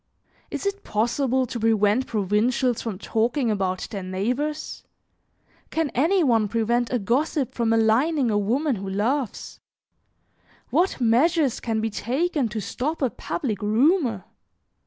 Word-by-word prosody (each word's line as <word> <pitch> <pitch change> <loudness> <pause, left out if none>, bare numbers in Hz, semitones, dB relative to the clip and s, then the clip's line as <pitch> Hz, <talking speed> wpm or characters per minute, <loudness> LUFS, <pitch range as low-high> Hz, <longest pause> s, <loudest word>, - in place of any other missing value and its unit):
Is - - -5
it 400 0 -2
possible 255 +4 0
to 240 0 -5
prevent 220 +2 +2
provincials 225 +4 +1
from 220 -5 -4
talking 230 +4 0
about 190 -3 -1
their 200 - -4
neighbors? 245 +12 -3 0.9
Can 320 -3 -1
any 335 +8 +3
one 225 -6 +3
prevent 230 +2 0
a 250 - +2
gossip 255 +5 0
from 235 -2 0
maligning 230 +5 +2
a 205 - +2
woman 250 +6 0
who 195 0 -5
loves? 230 +6 -2 1.1
What 365 -3 +1
measures 260 +3 +2
can 225 -2 -2
be 220 0 -1
taken 270 - -1
to 215 +1 -4
stop 285 - -3
a 255 - +1
public 215 -8 -4
rumor? 230 - +2
235 Hz, 135 wpm, -24 LUFS, 215-280 Hz, 1.1 s, any